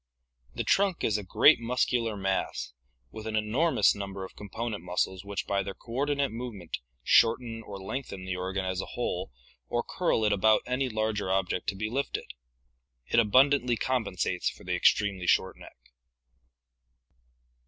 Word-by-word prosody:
The -, -, -1 dB
trunk 195 Hz, -3 st, +2 dB
is 105 Hz, -1 st, +2 dB
a -, -, -7 dB
great 145 Hz, +10 st, +5 dB
muscular 115 Hz, -2 st, 0 dB
mass 95 Hz, -9 st, -2 dB, 0.4 s
with 110 Hz, 0 st, -8 dB
an 110 Hz, -, -2 dB
enormous, 110 Hz, +4 st, +3 dB
number 95 Hz, -1 st, -5 dB
of -, -, -13 dB
com 105 Hz, -, -10 dB
ponent 110 Hz, -1 st, -4 dB
muscles 90 Hz, +1 st, -2 dB
which 100 Hz, 0 st, -4 dB
by 100 Hz, 0 st, 0 dB
their 100 Hz, -1 st, -6 dB
coordinate 140 Hz, +3 st, -1 dB
movement 110 Hz, -7 st, -6 dB, 0.2 s
shorten 115 Hz, -, +3 dB
or 100 Hz, -3 st, -8 dB
lengthen 95 Hz, -2 st, -5 dB
the 95 Hz, -1 st, -3 dB
organ 95 Hz, +1 st, -3 dB
as 95 Hz, 0 st, -1 dB
a -, -, -7 dB
whole -, -, -2 dB, 0.4 s
or 120 Hz, 0 st, -1 dB
curl 165 Hz, -11 st, 0 dB
it 105 Hz, -, +3 dB
about 110 Hz, +2 st, +4 dB
any 130 Hz, +1 st, -1 dB
larger 110 Hz, -3 st, -1 dB
object 95 Hz, -1 st, 0 dB
to 100 Hz, -, -1 dB
be 110 Hz, +3 st, -2 dB
lifted. 135 Hz, +5 st, -3 dB, 0.8 s
It -, -, +4 dB
abundantly 125 Hz, +3 st, +4 dB
compensates 105 Hz, -9 st, -1 dB
for -, -, -13 dB
the -, -, -2 dB
extremely 100 Hz, -4 st, +2 dB
short 95 Hz, -, +3 dB
neck. -, -, -14 dB
110 Hz, 155 wpm, -28 LUFS, 95-120 Hz, 0.8 s, great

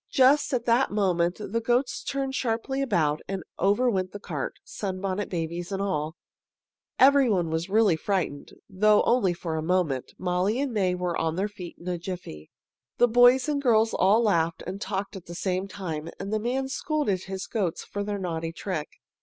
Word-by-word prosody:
Just 275 Hz, +2 st, +4 dB
at 245 Hz, -3 st, -1 dB
that 240 Hz, +3 st, +3 dB
moment 180 Hz, -4 st, +1 dB
the 215 Hz, +2 st, -3 dB
goats 245 Hz, +3 st, +1 dB
turned 275 Hz, -1 st, -2 dB
sharply 260 Hz, +2 st, -1 dB
about, 160 Hz, -, +1 dB
and 195 Hz, -2 st, -4 dB, 0.2 s
over 205 Hz, +7 st, +3 dB
went 185 Hz, -5 st, 0 dB
the 205 Hz, -, -6 dB
cart, 155 Hz, -9 st, -4 dB
Sunbonnet 190 Hz, 0 st, -3 dB
Babies 170 Hz, +1 st, -3 dB
and 195 Hz, -, -2 dB
all. 160 Hz, -5 st, -2 dB, 0.8 s
Everybody 255 Hz, -, +5 dB
was 160 Hz, +2 st, -1 dB
then 195 Hz, -, -4 dB
really 215 Hz, -6 st, +5 dB
frightened, 160 Hz, -5 st, -2 dB, 0.2 s
though 210 Hz, +2 st, +4 dB
only 235 Hz, -7 st, +3 dB
for 165 Hz, -2 st, -4 dB
a -, -, -1 dB
moment. 160 Hz, -6 st, 0 dB
Molly 185 Hz, +6 st, 0 dB
and 275 Hz, -3 st, -1 dB
May 185 Hz, -4 st, +1 dB
were 180 Hz, -1 st, -2 dB
on 160 Hz, 0 st, -1 dB
their 195 Hz, +3 st, 0 dB
feet 185 Hz, -4 st, -9 dB
in 170 Hz, -, -12 dB
a 180 Hz, -1 st, -2 dB
jiffy. 170 Hz, -, -7 dB, 0.5 s
The 245 Hz, -, +5 dB
boys 245 Hz, +3 st, +5 dB
and 290 Hz, -2 st, 0 dB
girls 225 Hz, -4 st, +3 dB
all 210 Hz, +5 st, +4 dB
laughed 170 Hz, -6 st, +1 dB
and 195 Hz, +2 st, -6 dB
talked 200 Hz, +1 st, -3 dB
at 185 Hz, -3 st, -10 dB
the 170 Hz, -, -7 dB
same 185 Hz, +1 st, -1 dB
time, 170 Hz, -6 st, -5 dB
and 200 Hz, -, -4 dB
the 215 Hz, -, +1 dB
man 255 Hz, +4 st, -1 dB
scolded 270 Hz, -, -1 dB
his 190 Hz, 0 st, -5 dB
goats 190 Hz, -7 st, -2 dB
for 205 Hz, -, -4 dB
their 205 Hz, 0 st, -3 dB
naughty 165 Hz, -3 st, -3 dB
trick. 170 Hz, -3 st, -4 dB
195 Hz, 185 wpm, -26 LUFS, 175-230 Hz, 0.8 s, Everybody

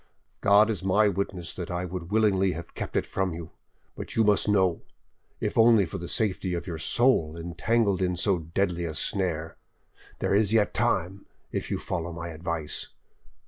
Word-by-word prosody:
"God 105 Hz, +2 st, +5 dB
is 95 Hz, -5 st, -4 dB
my 100 Hz, +3 st, +4 dB
witness 95 Hz, -3 st, -2 dB
that 90 Hz, -2 st, -5 dB
I 90 Hz, 0 st, -2 dB
would 90 Hz, -1 st, -6 dB
willingly 100 Hz, -3 st, +2 dB
have 85 Hz, +2 st, -8 dB
kept -, -, -4 dB
it -, -, +1 dB
from 95 Hz, -3 st, -2 dB
you, 85 Hz, -1 st, -8 dB, 0.4 s
but -, -, -7 dB
you 115 Hz, -, +4 dB
must 105 Hz, 0 st, +3 dB
know; 95 Hz, -4 st, +2 dB, 0.6 s
if -, -, -1 dB
only 115 Hz, -3 st, +6 dB
for 80 Hz, -, -6 dB
the 85 Hz, -, -6 dB
safety 95 Hz, -4 st, -1 dB
of 85 Hz, -, -4 dB
your 85 Hz, -3 st, -5 dB
soul 85 Hz, -7 st, +2 dB
entangled 95 Hz, +4 st, 0 dB
in 90 Hz, -1 st, +1 dB
so 90 Hz, +1 st, +1 dB
deadly 85 Hz, +2 st, -1 dB
a 80 Hz, -2 st, -4 dB
snare,... 85 Hz, -4 st, -2 dB, 0.6 s
there -, -, 0 dB
is 105 Hz, +1 st, +3 dB
yet 110 Hz, -2 st, +3 dB
time, 95 Hz, +4 st, -1 dB, 0.2 s
if -, -, -3 dB
you -, -, -1 dB
follow 85 Hz, +1 st, -4 dB
my 85 Hz, 0 st, -6 dB
advice. 80 Hz, -1 st, -3 dB
90 Hz, 180 wpm, -27 LUFS, 85-100 Hz, 0.6 s, only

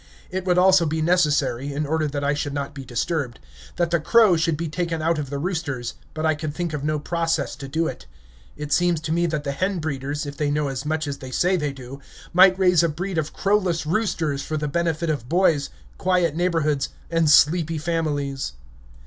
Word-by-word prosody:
It 185 Hz, 0 st, -3 dB
would 180 Hz, -1 st, +2 dB
also 185 Hz, -2 st, +5 dB
be 160 Hz, +1 st, -1 dB
necessary, 145 Hz, -6 st, +1 dB
in 145 Hz, +2 st, -2 dB
order 155 Hz, +1 st, 0 dB
that 145 Hz, 0 st, -3 dB
I 140 Hz, +1 st, +2 dB
should 145 Hz, -1 st, -3 dB
not 140 Hz, -1 st, -3 dB
be 140 Hz, -, -8 dB
disturbed, 130 Hz, +1 st, -2 dB, 0.4 s
that 170 Hz, -1 st, 0 dB
the 170 Hz, -, +3 dB
crow 215 Hz, +3 st, +5 dB
should 160 Hz, -1 st, +1 dB
be 165 Hz, +1 st, -3 dB
taken 165 Hz, +1 st, -2 dB
out 160 Hz, 0 st, +1 dB
of 140 Hz, -3 st, -4 dB
the 140 Hz, -, -3 dB
roosters, 145 Hz, -7 st, -3 dB, 0.2 s
but 155 Hz, 0 st, -2 dB
I 160 Hz, -, +3 dB
could 155 Hz, -1 st, -5 dB
think 175 Hz, -3 st, -3 dB
of 145 Hz, -2 st, -3 dB
no 155 Hz, 0 st, 0 dB
process 165 Hz, -1 st, -1 dB
to 135 Hz, -, -7 dB
do 160 Hz, +5 st, 0 dB
it. 65 Hz, -, -6 dB, 0.5 s
It 150 Hz, -1 st, -3 dB
seems 175 Hz, -2 st, +2 dB
to 160 Hz, -1 st, -4 dB
me 170 Hz, +1 st, +2 dB
that 155 Hz, -3 st, -2 dB
the 140 Hz, -, -2 dB
hen 185 Hz, +7 st, -1 dB
breeders, 145 Hz, -1 st, -3 dB
if 145 Hz, 0 st, -7 dB
they 150 Hz, -1 st, 0 dB
know 145 Hz, 0 st, 0 dB
as 135 Hz, +2 st, -4 dB
much 155 Hz, -1 st, -1 dB
as 140 Hz, -1 st, -4 dB
they 130 Hz, -, -8 dB
say 180 Hz, +8 st, +2 dB
they 150 Hz, -5 st, -1 dB
do, 135 Hz, 0 st, -10 dB, 0.3 s
might 185 Hz, +1 st, +7 dB
raise 180 Hz, -3 st, +4 dB
a 170 Hz, -, +2 dB
breed 175 Hz, +3 st, -3 dB
of 155 Hz, -1 st, -3 dB
crowless 185 Hz, -5 st, 0 dB
roosters 160 Hz, -6 st, 0 dB
for 155 Hz, +2 st, -3 dB
the 150 Hz, 0 st, -2 dB
benefit 165 Hz, +1 st, 0 dB
of 130 Hz, -6 st, -4 dB
boys, 165 Hz, -5 st, +2 dB, 0.3 s
quiet 180 Hz, -4 st, +1 dB
neighborhoods, 160 Hz, -5 st, 0 dB, 0.2 s
and 165 Hz, -2 st, +2 dB
sleepy 165 Hz, +2 st, +4 dB
families. 145 Hz, -, -2 dB
155 Hz, 215 wpm, -23 LUFS, 145-170 Hz, 0.5 s, might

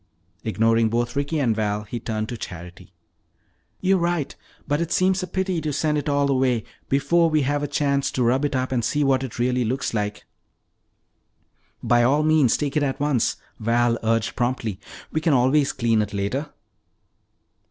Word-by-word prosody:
Ignoring 115 Hz, +1 st, +2 dB
both 120 Hz, +1 st, -1 dB
Ricky 145 Hz, +3 st, -1 dB
and 120 Hz, -7 st, +1 dB
Val, 105 Hz, -1 st, -1 dB
he 110 Hz, +3 st, -6 dB
turned 110 Hz, -1 st, -3 dB
to 120 Hz, -, -4 dB
Charity. 90 Hz, -5 st, -9 dB, 0.9 s
"You 190 Hz, +1 st, +3 dB
are -, -, -1 dB
right. 170 Hz, -4 st, -1 dB, 0.3 s
But 145 Hz, +2 st, 0 dB
it 170 Hz, -, -3 dB
seems 185 Hz, +1 st, +2 dB
a 185 Hz, -, -4 dB
pity 185 Hz, -3 st, -1 dB
to 155 Hz, -1 st, -2 dB
send 150 Hz, +1 st, 0 dB
it 145 Hz, 0 st, -1 dB
all 140 Hz, -1 st, +2 dB
away 130 Hz, -4 st, +1 dB, 0.3 s
before 165 Hz, +5 st, +3 dB
we 155 Hz, -2 st, +2 dB
have 145 Hz, +2 st, 0 dB
a 145 Hz, -, -1 dB
chance 140 Hz, -1 st, 0 dB
to 125 Hz, -, 0 dB
rub 130 Hz, +4 st, +2 dB
it 145 Hz, -2 st, 0 dB
up 130 Hz, 0 st, -1 dB
and 120 Hz, -3 st, 0 dB
see 145 Hz, +6 st, +1 dB
what 135 Hz, -2 st, +2 dB
it 130 Hz, -, -6 dB
really 125 Hz, +1 st, +1 dB
looks 125 Hz, +3 st, -2 dB
like!" 105 Hz, -1 st, -3 dB, 1.6 s
"By 120 Hz, 0 st, +3 dB
all 140 Hz, +5 st, +3 dB
means, 155 Hz, -6 st, +4 dB
take 145 Hz, -2 st, -3 dB
it 150 Hz, -, +2 dB
at 135 Hz, -2 st, -1 dB
once!" 140 Hz, -5 st, +1 dB, 0.2 s
Val 115 Hz, +1 st, +1 dB
urged 115 Hz, 0 st, 0 dB
promptly. 120 Hz, -5 st, -2 dB, 0.3 s
"We 155 Hz, -, -1 dB
can 155 Hz, -1 st, +2 dB
always 135 Hz, +3 st, +3 dB
clean 115 Hz, -3 st, +1 dB
it 105 Hz, -1 st, -4 dB
later." 125 Hz, +10 st, -2 dB
130 Hz, 185 wpm, -23 LUFS, 115-145 Hz, 1.6 s, means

